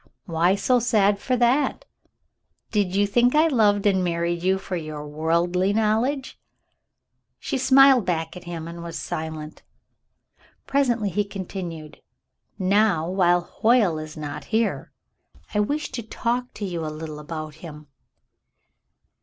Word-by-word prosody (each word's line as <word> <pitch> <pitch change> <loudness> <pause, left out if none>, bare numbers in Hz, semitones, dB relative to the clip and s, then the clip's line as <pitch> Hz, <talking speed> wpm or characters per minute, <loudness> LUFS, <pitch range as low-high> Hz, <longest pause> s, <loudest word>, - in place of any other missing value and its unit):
" - - -52
Why 170 +2 +2
so 245 +5 +2
sad 210 -4 +2
for 255 +3 0
that? 250 +4 +1 0.9
Did 200 -4 0
you 205 +1 +3
think 240 +6 +2
I 310 +2 +5
loved 210 -8 +2
you 205 - +6
and 190 -1 0
married 170 0 -1
you 190 +2 +2
for 190 -1 -5
your 155 -3 -6
worldly 170 +5 0
knowledge? 225 +6 0 0.5
" - - -57 0.3
She 265 - -3
smiled 265 -1 +6
back 165 -2 -2
at 180 - -10
him 165 -2 -6
and 170 0 -8
was 170 -1 -6
silent. 155 -1 -6 1.0
Presently 240 -7 +1
he 205 +4 +1
continued. 180 -5 -7 0.6
"Now, 195 -3 +2
while 175 -2 +3
Hoyle 215 -3 +2
is 155 0 -8
not 150 -1 -6
here, 220 -10 -1 0.6
I - - +1
wish 290 +9 -1
to 255 -2 -4
talk 240 +3 -2
to 205 - -4
you 175 -4 -4
a - - -3
little 155 0 -6
about 155 0 -6
him." 150 -3 -10
190 Hz, 145 wpm, -24 LUFS, 165-225 Hz, 1.0 s, you